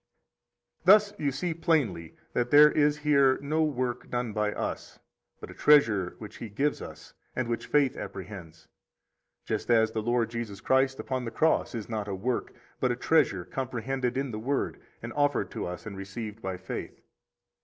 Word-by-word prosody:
37 - - +10 0.2
Thus - - -25
you 140 - +2
see 165 +6 -2
plainly 140 - 0 0.2
that 120 0 0
there 150 +2 +8
is 150 0 +3
here 140 -3 +4
no 150 +3 0
work 130 -5 -1
done 120 -3 -2
by 105 0 0
us, - - -5 0.4
but - - -9
a - - -10
treasure 105 -11 +4
which 105 - -10
He 115 - -7
gives 140 +8 -1
us, - - -10 0.2
and 130 -2 -1
which 115 -1 -3
faith 140 -2 +3
apprehends; 90 -5 -8 0.8
just - - -3
as 110 -2 +4
the 110 - -2
Lord 120 0 0
Jesus 115 -4 -5
Christ 130 +2 +2
upon 130 -1 -3
the - - -2
cross 155 +2 +1
is 110 -3 -5
not 110 -3 -3
a 100 - -3
work, 120 +6 -2 0.3
but 125 - +2
a - - 0
treasure 125 - +2
comprehended 130 0 -3
in 135 -1 -1
the 110 - -4
Word, 135 +5 -2 0.2
and - - -5
offered 145 -2 +1
to - - -4
us 90 0 -7
and 105 -2 -6
received 105 +3 -7
by 95 -1 -4
faith. 95 +1 -6
120 Hz, 180 wpm, -28 LUFS, 105-140 Hz, 0.8 s, 37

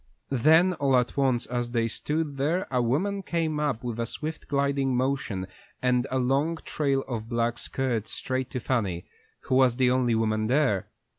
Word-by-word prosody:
Then 160 +8 +5
all 140 -5 +2
at 125 -1 0
once 130 -4 +1
as 120 -1 -2
they 115 -1 +1
stood 150 +4 -2
there 160 +7 0
a 125 -1 +2
woman 185 +12 0
came 165 -4 -1
up 140 -5 -1
with 120 -2 -4
a 115 - -1
swift, 155 +6 -5
gliding 140 -2 +1
motion 130 -8 -1 0.3
and 125 0 +1
a 130 - -1
long 135 +6 +1
trail 140 -3 0
of 115 -3 -4
black 120 0 0
skirts 120 -5 -2
straight 130 -1 -3
to 125 - -3
Fanny, 105 -9 -1 0.4
who - - -3
was 130 -2 +5
the 125 -1 +3
only 125 -2 +2
woman 110 -1 +1
there. 125 -6 +2
130 Hz, 175 wpm, -27 LUFS, 120-140 Hz, 0.4 s, Then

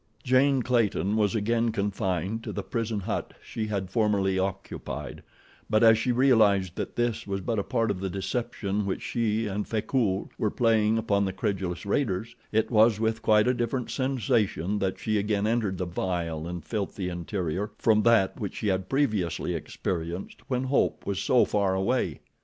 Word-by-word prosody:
Jane 130 +1 +3
Clayton 110 -4 +1
was 105 -2 +2
again 115 +2 +1
confined 100 0 -2
to - - -4
the - - -4
prison 115 -3 -2
hut - - -3
she 110 -1 -5
had 95 -3 -3
formerly 100 -3 +2
occupied, 95 -7 -4 0.5
but 110 +1 +3
as 110 -1 +8
she 120 +3 0
realized 110 -8 +3
that - - -4
this 120 -3 -1
was 100 0 -2
but 115 +2 -1
a - - 0
part 115 -1 0
of 90 - -4
the 95 0 -2
deception 100 +1 -2
which 95 - -3
she 115 -1 0
and 105 0 -3
Frecoult 110 -3 0
were 105 - +1
playing 110 -1 +2
upon 100 -2 +1
the 95 - -1
credulous 95 -3 -2
raiders, 110 -1 -1 0.2
it 110 +1 +1
was 110 -1 +5
with 110 0 0
quite 105 +1 +4
a 125 - +4
different 120 +1 -2
sensation 110 - 0
that 95 -2 -1
she 110 -1 0
again 105 0 0
entered 110 -4 0
the 90 - -2
vile 85 -2 -3
and 85 -1 -6
filthy 100 -3 -3
interior, 90 +2 -3
from 110 -2 +3
that 110 -4 +3
which 100 -4 -4
she 105 - -1
had 95 -1 -1
previously 110 - 0
experienced, 85 0 -4
when 130 -2 -1
hope 130 +1 0
was 100 -2 -2
so 125 - +4
far 100 -2 +1
away. 95 - 0
105 Hz, 175 wpm, -27 LUFS, 95-115 Hz, 0.5 s, as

